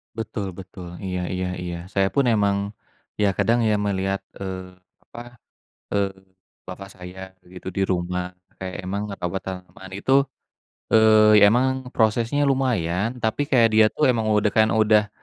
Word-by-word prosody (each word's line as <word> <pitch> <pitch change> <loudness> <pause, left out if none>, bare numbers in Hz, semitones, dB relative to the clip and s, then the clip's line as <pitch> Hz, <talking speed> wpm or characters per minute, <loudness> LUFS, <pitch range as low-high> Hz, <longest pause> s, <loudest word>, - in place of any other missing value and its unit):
Betul 105 -4 -4
betul, 90 -1 -10
iya 90 -1 -3
iya 90 0 -2
iya. 90 -1 -4 0.2
Saya 95 -1 +2
pun, 140 -3 +3
emang 100 -3 +2 0.6
ya, 100 -1 +3
kadang 120 +1 +2
ya, - - +3
melihat, 95 -1 -1 0.2
eee, 95 -1 -7 0.3
apa, 120 0 -11 0.5
eee, 100 -1 +1 0.6
Bapak 95 +1 -8
saya 95 +1 -9
begitu 90 0 -12
di 95 - -2
rumah. 90 0 -2 0.2
Kayak 95 -1 -5
emang 100 +3 -3
ngerawat 95 -2 -4
tanaman 95 0 -8
itu, 100 +6 -2 0.8
eee, 110 -1 +6
emang 130 +2 0
prosesnya 115 +6 +2
lumayan, 115 -5 0
tapi 110 +4 -1
kayak 115 -4 +5
dia 110 0 +6
tuh 150 - 0
emang 110 -3 -1
udah, 105 -1 +2
kan, 110 0 +4
udah 105 -2 +3
100 Hz, 145 wpm, -23 LUFS, 95-110 Hz, 0.8 s, eee